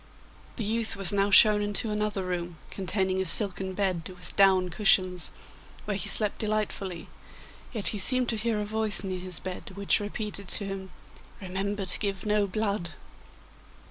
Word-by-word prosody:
The 230 - -4
youth 225 +2 -1
was 195 0 +1
now 200 0 +1
shown 210 +1 +7
into 205 +2 -1
another 210 -2 -2
room, 175 -2 -4
containing 190 0 -1
a - - -2
silken 190 0 +4
bed 185 -4 -2
with 180 -1 -8
down 190 -2 +4
cushions, 185 -1 +2 0.6
where 210 - -2
he 190 - +1
slept 210 -2 +4
delightfully, 210 -5 -3 0.6
yet 220 -5 -1
he 210 - -1
seemed 255 +5 +4
to 230 - 0
hear 220 0 -1
a 210 - -3
voice 215 -1 +1
near 185 -1 -4
his 180 -3 -6
bed 185 0 -8
which 200 +2 +2
repeated 205 -1 -5
to 200 - -1
him, 195 -1 -6 0.5
'Remember 195 +1 -4
to 180 - +3
give 200 -2 -3
no 210 -1 +1
blood! 200 -3 -3
200 Hz, 165 wpm, -27 LUFS, 185-210 Hz, 0.6 s, shown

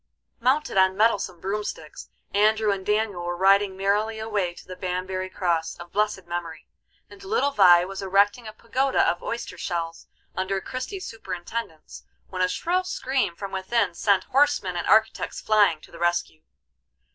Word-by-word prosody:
Mounted 260 -1 +1
on 190 0 +3
mettlesome 205 -5 +1
broomsticks 195 -5 -5 0.2
Andrew 215 +1 +3
and 195 -1 -3
Daniel 210 -3 0
were 175 0 -3
riding 195 +1 +3
merrily 205 +3 0
away 205 -5 -2
to - - -13
the 185 - -7
Banbury 185 +1 -3
Cross, 170 -4 -1
of 175 0 -11
blessed 210 -2 0
memory, 170 -2 -6 0.4
and 390 - -15
little 390 -8 +1
Vie 180 -7 +6
was 195 +1 -6
erecting 200 +4 +2
a 215 - -8
pagoda 260 +5 +1
of 175 - 0
oyster 230 -6 -5
shells, 170 -2 -4 0.3
under 190 +1 -1
Christie's 260 - -6
superintendence, 180 -4 -6 0.3
when 185 -1 -4
a 185 - +4
shrill 360 - 0
scream 260 - -1
from 195 +2 -7
within 190 0 0
sent 195 +1 +2
horsemen 270 -9 +2
and 175 - -3
architects 220 0 +2
flying 205 -7 +3
to - - -16
the 170 - -12
rescue. 175 -2 -1
195 Hz, 155 wpm, -25 LUFS, 180-220 Hz, 0.4 s, Vie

